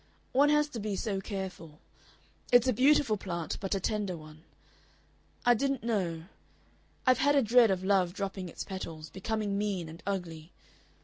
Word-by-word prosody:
One 285 Hz, +3 st, +4 dB
has 300 Hz, 0 st, +3 dB
to 240 Hz, -, -6 dB
be 205 Hz, -1 st, -2 dB
so 195 Hz, -1 st, -2 dB
careful.... 190 Hz, -6 st, -6 dB, 0.7 s
It's 245 Hz, +1 st, +6 dB
a 255 Hz, -, +3 dB
beautiful 260 Hz, -2 st, +4 dB
plant, 170 Hz, -5 st, -4 dB
but 195 Hz, 0 st, -2 dB
a -, -, 0 dB
tender 200 Hz, -2 st, -2 dB
one.... 155 Hz, 0 st, -13 dB, 1.0 s
I 245 Hz, -, +7 dB
didn't 275 Hz, +1 st, -1 dB
know. 185 Hz, -8 st, -1 dB, 0.8 s
I've 255 Hz, -1 st, +4 dB
a 285 Hz, 0 st, +4 dB
dread 230 Hz, +1 st, +5 dB
of 185 Hz, -1 st, 0 dB
love 190 Hz, -2 st, +2 dB
dropping 195 Hz, -1 st, -4 dB
its -, -, -6 dB
petals, 165 Hz, -5 st, -7 dB
becoming 205 Hz, 0 st, -2 dB
mean 200 Hz, -5 st, -2 dB
and 160 Hz, +2 st, -11 dB
ugly. 170 Hz, -4 st, -4 dB
200 Hz, 160 wpm, -30 LUFS, 180-235 Hz, 1.0 s, I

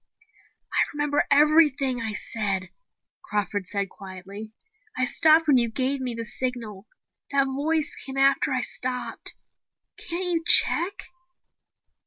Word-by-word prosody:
"I -, -, +1 dB
remember 295 Hz, 0 st, -1 dB
everything 285 Hz, -3 st, +3 dB
I 220 Hz, -2 st, -4 dB
said," 200 Hz, -4 st, -3 dB, 0.5 s
Crawford 205 Hz, -, -3 dB
said 200 Hz, 0 st, -2 dB
quietly. 195 Hz, +3 st, -11 dB, 0.5 s
"I 255 Hz, -, +1 dB
stopped 315 Hz, +4 st, +3 dB
when 280 Hz, -3 st, +5 dB
you 235 Hz, -1 st, +2 dB
gave 265 Hz, +4 st, -1 dB
me 250 Hz, -2 st, -3 dB
the 230 Hz, 0 st, -6 dB
signal. 235 Hz, -4 st, -5 dB, 0.4 s
That 275 Hz, -1 st, +1 dB
voice 290 Hz, +3 st, -1 dB
came 270 Hz, 0 st, -8 dB
after 275 Hz, 0 st, +2 dB
I 255 Hz, -1 st, 0 dB
stopped. 250 Hz, 0 st, -5 dB, 0.6 s
Can't 350 Hz, +2 st, -3 dB
you 325 Hz, -, -6 dB
check 350 Hz, +2 st, +5 dB
255 Hz, 125 wpm, -24 LUFS, 215-290 Hz, 0.6 s, when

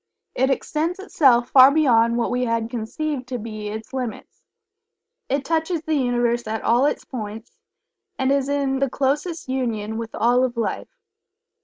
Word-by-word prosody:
It 265 Hz, +1 st, +1 dB
extends 310 Hz, +5 st, -1 dB
itself 265 Hz, -, +3 dB
far 260 Hz, 0 st, +9 dB
beyond 235 Hz, -6 st, +3 dB
what 235 Hz, -, 0 dB
we 250 Hz, 0 st, 0 dB
had 230 Hz, -1 st, -1 dB
conceived 255 Hz, +3 st, -4 dB
to 250 Hz, -1 st, -3 dB
be 215 Hz, -2 st, -6 dB
its 220 Hz, +4 st, -7 dB
limits. 250 Hz, -4 st, -6 dB, 0.9 s
It 275 Hz, +1 st, -1 dB
touches 325 Hz, 0 st, -1 dB
the 315 Hz, -, -2 dB
Universe 240 Hz, -4 st, 0 dB
at 220 Hz, 0 st, -3 dB
all 245 Hz, +5 st, +3 dB
its -, -, -3 dB
points, 220 Hz, -2 st, -7 dB, 0.7 s
and 265 Hz, 0 st, +1 dB
is 280 Hz, -1 st, +1 dB
in 275 Hz, -2 st, 0 dB
the 275 Hz, -1 st, +1 dB
closest 295 Hz, +6 st, -1 dB
union 225 Hz, -4 st, -2 dB
with 230 Hz, -1 st, -6 dB
all 245 Hz, +3 st, +3 dB
of 250 Hz, -2 st, -2 dB
Life. 230 Hz, -, -2 dB
255 Hz, 160 wpm, -22 LUFS, 230-280 Hz, 0.9 s, far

